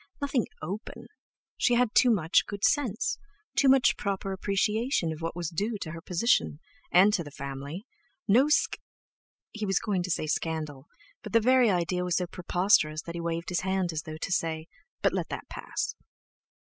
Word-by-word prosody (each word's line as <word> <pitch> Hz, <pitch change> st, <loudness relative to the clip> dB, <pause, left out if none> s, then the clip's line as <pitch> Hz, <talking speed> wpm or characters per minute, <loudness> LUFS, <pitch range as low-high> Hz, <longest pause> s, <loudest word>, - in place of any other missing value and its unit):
Nothing 280 Hz, -5 st, 0 dB, 0.2 s
open; 195 Hz, +7 st, -6 dB, 0.5 s
she 245 Hz, -, +3 dB
had 245 Hz, -1 st, +2 dB
too 250 Hz, -, +5 dB
much 175 Hz, -7 st, +3 dB
good 205 Hz, -1 st, -6 dB
sense, 250 Hz, -8 st, +1 dB, 0.4 s
too 275 Hz, -, +4 dB
much 260 Hz, -3 st, +5 dB
proper 195 Hz, -1 st, -2 dB
appreciation 200 Hz, -, 0 dB
of 155 Hz, -, -10 dB
what 165 Hz, 0 st, -3 dB
was 175 Hz, -3 st, -3 dB
due 205 Hz, +7 st, -2 dB
to 160 Hz, -, -4 dB
her 165 Hz, 0 st, -8 dB
position, 180 Hz, -3 st, +1 dB, 0.3 s
and 195 Hz, +4 st, +6 dB
to 175 Hz, -, +1 dB
the 145 Hz, -, -9 dB
family! 140 Hz, -, -7 dB, 0.4 s
No 250 Hz, +8 st, +5 dB
sc—, 300 Hz, -, +2 dB, 0.7 s
he 220 Hz, -, -6 dB
was 195 Hz, -1 st, +2 dB
going 200 Hz, -4 st, 0 dB
to 180 Hz, -, -4 dB
say 165 Hz, -, 0 dB
"scandal" 155 Hz, -2 st, -3 dB, 0.3 s
but -, -, -9 dB
the 230 Hz, -, +6 dB
very 250 Hz, +1 st, +4 dB
idea 180 Hz, -1 st, 0 dB
was 180 Hz, -1 st, 0 dB
so 180 Hz, -, 0 dB
preposterous 175 Hz, -3 st, +1 dB
that 170 Hz, -, -7 dB
he 170 Hz, -, -4 dB
waved 170 Hz, 0 st, -3 dB
his 175 Hz, -2 st, 0 dB
hand 190 Hz, -2 st, -1 dB
as 155 Hz, -, -2 dB
though 155 Hz, 0 st, -8 dB
to 170 Hz, -, -5 dB
say—"but 165 Hz, -, -2 dB
let -, -, -2 dB
that -, -, -6 dB
pass!" 445 Hz, -, -4 dB
185 Hz, 180 wpm, -28 LUFS, 165-220 Hz, 0.7 s, and